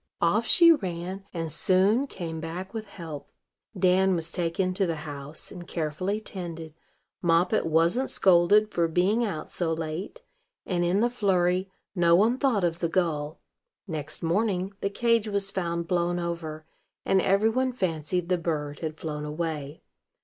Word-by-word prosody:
Off -, -, +2 dB
she 335 Hz, -1 st, +7 dB
ran, 190 Hz, -, -2 dB
and 165 Hz, -2 st, -4 dB
soon 195 Hz, -, +3 dB
came 165 Hz, -8 st, -6 dB
back 175 Hz, +5 st, -6 dB
with 220 Hz, -2 st, -5 dB
help. 165 Hz, -7 st, -8 dB, 0.5 s
Dan 185 Hz, +1 st, +3 dB
was 165 Hz, 0 st, -4 dB
taken 180 Hz, +2 st, -1 dB
to 190 Hz, 0 st, 0 dB
the 165 Hz, -, -1 dB
house, 145 Hz, +1 st, -7 dB
and 175 Hz, -2 st, -9 dB
carefully 170 Hz, +6 st, -2 dB
tended; 170 Hz, -6 st, -7 dB, 0.5 s
Moppet 175 Hz, +3 st, +2 dB
wasn't 165 Hz, +11 st, +2 dB
scolded 195 Hz, +4 st, +4 dB
for 170 Hz, -1 st, +1 dB
being 185 Hz, +8 st, +2 dB
out 170 Hz, -9 st, -4 dB
so 170 Hz, -2 st, -1 dB
late; 165 Hz, -, -4 dB, 0.4 s
and, 175 Hz, -2 st, 0 dB
in 180 Hz, +4 st, +2 dB
the 240 Hz, -, +3 dB
flurry, 185 Hz, -4 st, +1 dB, 0.2 s
no 170 Hz, -3 st, +4 dB
one 225 Hz, +7 st, +3 dB
thought 245 Hz, -9 st, +2 dB
of 170 Hz, -1 st, 0 dB
the 170 Hz, -, 0 dB
gull. 155 Hz, -4 st, -1 dB, 0.5 s
Next 155 Hz, -3 st, -4 dB
morning, 190 Hz, +2 st, 0 dB
the 200 Hz, -, 0 dB
cage 230 Hz, +1 st, +1 dB
was 200 Hz, -1 st, 0 dB
found 170 Hz, -3 st, -2 dB
blown 175 Hz, 0 st, +1 dB
over, 165 Hz, -3 st, -4 dB, 0.4 s
and 190 Hz, -, +3 dB
every 200 Hz, +4 st, +3 dB
one 255 Hz, +3 st, 0 dB
fancied 180 Hz, -5 st, -2 dB
the 180 Hz, -1 st, +1 dB
bird 150 Hz, -3 st, -3 dB
had 155 Hz, -1 st, -4 dB
flown 150 Hz, -2 st, -5 dB
away. 150 Hz, -1 st, -4 dB
175 Hz, 155 wpm, -27 LUFS, 165-195 Hz, 0.5 s, she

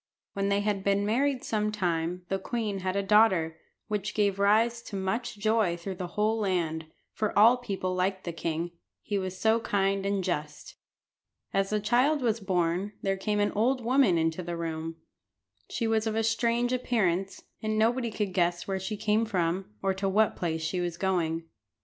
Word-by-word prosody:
When 200 Hz, 0 st, -1 dB
they 200 Hz, 0 st, +2 dB
had 205 Hz, -2 st, -1 dB
been 200 Hz, 0 st, +2 dB
married 260 Hz, +4 st, +1 dB
some 215 Hz, -1 st, 0 dB
time 175 Hz, -3 st, -1 dB
the 195 Hz, 0 st, -1 dB
queen 210 Hz, -1 st, -2 dB
had 185 Hz, 0 st, -2 dB
a 200 Hz, -, +1 dB
daughter, 190 Hz, -6 st, +3 dB, 0.3 s
which 210 Hz, -1 st, -3 dB
gave 200 Hz, -2 st, +1 dB
rise 225 Hz, +4 st, +3 dB
to 220 Hz, -, -8 dB
much 195 Hz, +4 st, -2 dB
joy 215 Hz, -4 st, +2 dB
through 190 Hz, +3 st, -5 dB
the 180 Hz, -1 st, -4 dB
whole 215 Hz, +2 st, +2 dB
land, 165 Hz, -6 st, -1 dB, 0.3 s
for 215 Hz, -1 st, -2 dB
all 230 Hz, +4 st, +7 dB
people 195 Hz, -6 st, -3 dB
liked 185 Hz, +1 st, -1 dB
the 170 Hz, -, -4 dB
king, 165 Hz, +1 st, -3 dB, 0.3 s
he 205 Hz, -1 st, -1 dB
was 185 Hz, -1 st, -4 dB
so 220 Hz, +1 st, +3 dB
kind 195 Hz, -3 st, 0 dB
and 200 Hz, -1 st, 0 dB
just. 150 Hz, -5 st, -4 dB, 0.8 s
As 195 Hz, 0 st, +1 dB
the 215 Hz, -, +1 dB
child 255 Hz, +7 st, +2 dB
was 230 Hz, -2 st, +1 dB
born 185 Hz, 0 st, 0 dB
there 195 Hz, 0 st, +1 dB
came 210 Hz, +2 st, -1 dB
an 205 Hz, 0 st, +2 dB
old 240 Hz, +3 st, +1 dB
woman 245 Hz, -8 st, +4 dB
into 165 Hz, +2 st, 0 dB
the 170 Hz, -1 st, -4 dB
room. 165 Hz, -1 st, -4 dB, 0.7 s
She 230 Hz, -, -2 dB
was 225 Hz, 0 st, +1 dB
of 220 Hz, -, -1 dB
a 225 Hz, -, +1 dB
strange 235 Hz, +2 st, +1 dB
appearance, 195 Hz, -7 st, 0 dB, 0.2 s
and 215 Hz, 0 st, -1 dB
nobody 235 Hz, +2 st, +2 dB
could 210 Hz, -3 st, -3 dB
guess 175 Hz, -1 st, +1 dB
where 190 Hz, -1 st, -1 dB
she 205 Hz, +3 st, -4 dB
came 215 Hz, +1 st, +2 dB
from, 185 Hz, -3 st, -1 dB, 0.2 s
or 195 Hz, -, +2 dB
to 195 Hz, +1 st, -1 dB
what 210 Hz, +2 st, +3 dB
place 160 Hz, -2 st, -2 dB
she 180 Hz, +3 st, -1 dB
was 175 Hz, -1 st, -3 dB
going. 170 Hz, -4 st, 0 dB
200 Hz, 185 wpm, -28 LUFS, 180-220 Hz, 0.8 s, all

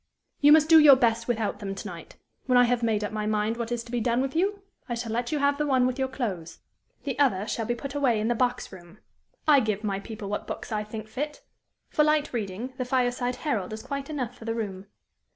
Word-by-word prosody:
"You 290 Hz, +1 st, +6 dB
must 310 Hz, 0 st, +7 dB
do 320 Hz, 0 st, +8 dB
your 295 Hz, -3 st, +9 dB
best 230 Hz, -2 st, +1 dB
without 220 Hz, -4 st, -1 dB
them 195 Hz, -2 st, -5 dB
to -, -, -6 dB
night. -, -, -10 dB, 0.3 s
When 250 Hz, -1 st, +4 dB
I 245 Hz, -, +7 dB
have 245 Hz, 0 st, +1 dB
made 220 Hz, -2 st, +1 dB
up 205 Hz, -, -3 dB
my 215 Hz, -1 st, -3 dB
mind 215 Hz, +1 st, 0 dB
what 235 Hz, 0 st, -4 dB
is 240 Hz, -1 st, -2 dB
to 235 Hz, -, -13 dB
be 245 Hz, -, 0 dB
done 235 Hz, +1 st, +1 dB
with 270 Hz, +3 st, -2 dB
you, 395 Hz, +3 st, 0 dB, 0.3 s
I 240 Hz, -, -1 dB
shall 230 Hz, -1 st, -4 dB
let 240 Hz, +3 st, -2 dB
you 305 Hz, -, 0 dB
have 280 Hz, 0 st, +1 dB
the 300 Hz, -, 0 dB
one 260 Hz, -2 st, +3 dB
with 255 Hz, +1 st, -1 dB
your 265 Hz, -, +1 dB
clothes; 205 Hz, -, -4 dB, 0.5 s
the 275 Hz, -2 st, -4 dB
other 210 Hz, -9 st, +2 dB
shall 225 Hz, -2 st, -2 dB
be 240 Hz, -, 0 dB
put 275 Hz, +3 st, -6 dB
away 265 Hz, -6 st, +2 dB
in 215 Hz, -, -1 dB
the 240 Hz, -, +2 dB
box 245 Hz, +1 st, -1 dB
room. 175 Hz, 0 st, -13 dB, 0.5 s
I 295 Hz, -2 st, +7 dB
give 215 Hz, -3 st, -1 dB
my 200 Hz, -2 st, -1 dB
people 215 Hz, 0 st, -8 dB
what 205 Hz, -, -4 dB
books -, -, -6 dB
I 210 Hz, -1 st, -1 dB
think 215 Hz, 0 st, -7 dB
fit. 295 Hz, +7 st, -5 dB, 0.5 s
For 300 Hz, -, +3 dB
light 300 Hz, -1 st, +1 dB
reading, 225 Hz, +3 st, -4 dB
the -, -, +1 dB
'Fireside 245 Hz, -1 st, 0 dB
Herald' 215 Hz, -9 st, -1 dB
is 220 Hz, 0 st, -7 dB
quite 280 Hz, 0 st, -5 dB
enough 255 Hz, -6 st, -4 dB
for 225 Hz, -, -12 dB
the 225 Hz, 0 st, -2 dB
room. 200 Hz, -4 st, -5 dB
240 Hz, 250 wpm, -26 LUFS, 215-270 Hz, 0.5 s, your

